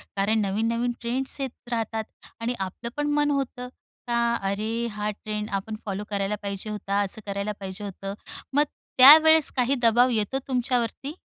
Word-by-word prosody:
कारण 205 Hz, +3 st, +2 dB
नवीन-नवीन 225 Hz, +4 st, 0 dB
ट्रेंड्स 255 Hz, +4 st, -2 dB
येत 260 Hz, -2 st, -6 dB
राहतात 225 Hz, -1 st, -1 dB, 0.4 s
आणि 235 Hz, +2 st, 0 dB
आपलं 190 Hz, +5 st, -5 dB
पण 295 Hz, 0 st, 0 dB
मन 295 Hz, 0 st, +2 dB
होतं 265 Hz, -3 st, -2 dB, 0.4 s
का. 235 Hz, 0 st, +2 dB
अरे! 215 Hz, +4 st, -2 dB
हा 210 Hz, 0 st, -2 dB
ट्रेंड 210 Hz, 0 st, -5 dB
आपण 200 Hz, +2 st, -3 dB
फॉलो 200 Hz, 0 st, -3 dB
करायला 200 Hz, 0 st, -1 dB
पाहिजे 200 Hz, +1 st, -5 dB
होता. 205 Hz, -1 st, -2 dB
असं 205 Hz, +2 st, -3 dB
करायला 200 Hz, +1 st, -2 dB
पाहिजे 195 Hz, +1 st, -6 dB
होतं 195 Hz, 0 st, -6 dB, 0.4 s
मग 290 Hz, -, +6 dB, 0.3 s
त्यावेळेस 315 Hz, +3 st, +8 dB
काही 255 Hz, +1 st, +2 dB
दबाव 240 Hz, +2 st, +5 dB
येतो 230 Hz, +3 st, 0 dB
तुमच्यावरती? 250 Hz, +1 st, -1 dB
225 Hz, 155 wpm, -25 LUFS, 205-250 Hz, 0.4 s, त्यावेळेस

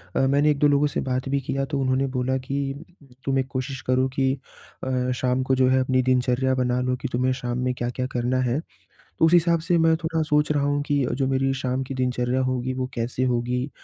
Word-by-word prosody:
अ, -, -, +2 dB
मैंने 145 Hz, +2 st, +3 dB
1-2 145 Hz, 0 st, +3 dB
लोगों 145 Hz, +1 st, +3 dB
से -, -, +1 dB
बात 130 Hz, +1 st, -1 dB
भी 140 Hz, 0 st, +1 dB
किया 135 Hz, +1 st, -2 dB
तो 140 Hz, -1 st, -3 dB
उन्होंने 130 Hz, +1 st, +1 dB
बोला 130 Hz, +1 st, 0 dB
कि 140 Hz, 0 st, -2 dB, 0.5 s
तो 135 Hz, -, 0 dB
मैं 135 Hz, 0 st, +2 dB
कोशिश 130 Hz, 0 st, -4 dB
करुँ 130 Hz, +1 st, +3 dB
की 135 Hz, -1 st, +2 dB, 0.5 s
अ, 125 Hz, -1 st, 0 dB
शाम 125 Hz, +1 st, 0 dB
को 130 Hz, 0 st, +1 dB
जो 130 Hz, 0 st, +3 dB
है 130 Hz, 0 st, +3 dB
अपनी 130 Hz, 0 st, +2 dB
दिनचर्या 130 Hz, +1 st, +2 dB
बना 125 Hz, -1 st, 0 dB
लो 125 Hz, 0 st, 0 dB
कि -, -, -2 dB
तुम्हें 130 Hz, +1 st, +1 dB
शाम 125 Hz, -1 st, -3 dB
में 125 Hz, -, 0 dB
क्या-क्या 125 Hz, +1 st, -3 dB
करना 125 Hz, +1 st, 0 dB
है। 125 Hz, +4 st, 0 dB, 0.6 s
उस 160 Hz, +2 st, +5 dB
हिसाब 170 Hz, -1 st, +4 dB
से 170 Hz, +2 st, +1 dB
मैं 165 Hz, 0 st, +4 dB
थोड़ा 160 Hz, -1 st, -1 dB
सोच 150 Hz, 0 st, +2 dB
रहा 145 Hz, -1 st, +1 dB
हूँ 145 Hz, 0 st, +1 dB
कि 145 Hz, -3 st, +2 dB
अ, 120 Hz, -, -2 dB
जो 135 Hz, +1 st, 0 dB
मेरी 135 Hz, 0 st, +1 dB
शाम 130 Hz, +1 st, -1 dB
की 135 Hz, -, -6 dB
दिनचर्या 125 Hz, 0 st, 0 dB
होगी 130 Hz, 0 st, -1 dB
वो 130 Hz, 0 st, -2 dB
कैसे 120 Hz, +2 st, -2 dB
होगी? 125 Hz, +2 st, 0 dB
130 Hz, 225 wpm, -24 LUFS, 125-140 Hz, 0.6 s, उस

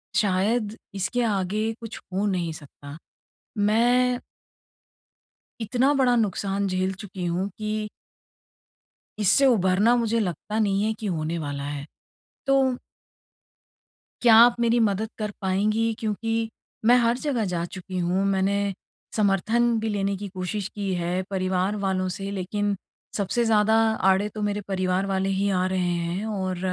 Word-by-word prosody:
शायद 210 Hz, +2 st, +1 dB, 0.2 s
इसके 195 Hz, +6 st, -1 dB
आगे 210 Hz, +1 st, 0 dB
कुछ 225 Hz, -1 st, -7 dB
हो 195 Hz, +2 st, 0 dB
नहीं 180 Hz, -4 st, -1 dB
सकता। 145 Hz, -1 st, -11 dB, 0.6 s
मैं 245 Hz, +4 st, +3 dB, 1.4 s
इतना 250 Hz, +5 st, +2 dB
बड़ा 260 Hz, -3 st, +3 dB
नुकसान 200 Hz, -2 st, 0 dB
झेल 185 Hz, 0 st, 0 dB
चुकी 190 Hz, -3 st, -6 dB
हूँ 175 Hz, +3 st, -1 dB
कि 215 Hz, 0 st, -3 dB, 1.3 s
इससे 215 Hz, +7 st, +5 dB
उभरना, 210 Hz, -1 st, +4 dB
मुझे 230 Hz, -1 st, +1 dB
लगता 210 Hz, +3 st, -3 dB
नहीं 200 Hz, -2 st, +2 dB
है 220 Hz, -, +1 dB
कि 215 Hz, -, -7 dB
होने 165 Hz, -2 st, -2 dB
वाला 145 Hz, -2 st, -4 dB
है। 145 Hz, 0 st, -5 dB, 0.6 s
तो 275 Hz, 0 st, +4 dB, 1.6 s
क्या 235 Hz, -2 st, +7 dB
आप 235 Hz, +1 st, +7 dB
मेरी 235 Hz, 0 st, +3 dB
मदद 210 Hz, +2 st, -1 dB
कर 210 Hz, -1 st, -2 dB
पाएँगी? 215 Hz, +4 st, +1 dB
क्योंकि 225 Hz, +1 st, -2 dB, 0.4 s
मैं 245 Hz, +2 st, +7 dB
हर 235 Hz, 0 st, +2 dB
जगह 260 Hz, -6 st, -1 dB
जा 170 Hz, -1 st, -1 dB
चुकी 185 Hz, +1 st, -6 dB
हूँ। 180 Hz, +2 st, +1 dB
मैंने 195 Hz, 0 st, +1 dB, 0.6 s
समर्थन 225 Hz, +3 st, +2 dB
भी 220 Hz, -, -2 dB
लेने 200 Hz, -1 st, -1 dB
की 200 Hz, +1 st, -6 dB
कोशिश 190 Hz, +1 st, -4 dB
की 200 Hz, -2 st, -2 dB
है 175 Hz, +1 st, -1 dB
परिवार 185 Hz, +1 st, 0 dB
वालों 190 Hz, -2 st, -1 dB
से, 195 Hz, +2 st, -4 dB
लेकिन 200 Hz, +1 st, -2 dB, 0.4 s
सबसे 215 Hz, +4 st, 0 dB
ज़्यादा 220 Hz, -1 st, +3 dB, 0.4 s
आड़े 195 Hz, +2 st, +2 dB
तो 215 Hz, -, -4 dB
मेरे 205 Hz, 0 st, -1 dB
परिवार 185 Hz, 0 st, 0 dB
वाले 195 Hz, 0 st, 0 dB
ही 195 Hz, +1 st, 0 dB
आ 185 Hz, -1 st, +1 dB
रहे 185 Hz, 0 st, -1 dB
हैं 175 Hz, +3 st, -1 dB
और 190 Hz, -4 st, -2 dB
200 Hz, 140 wpm, -25 LUFS, 185-220 Hz, 1.6 s, क्या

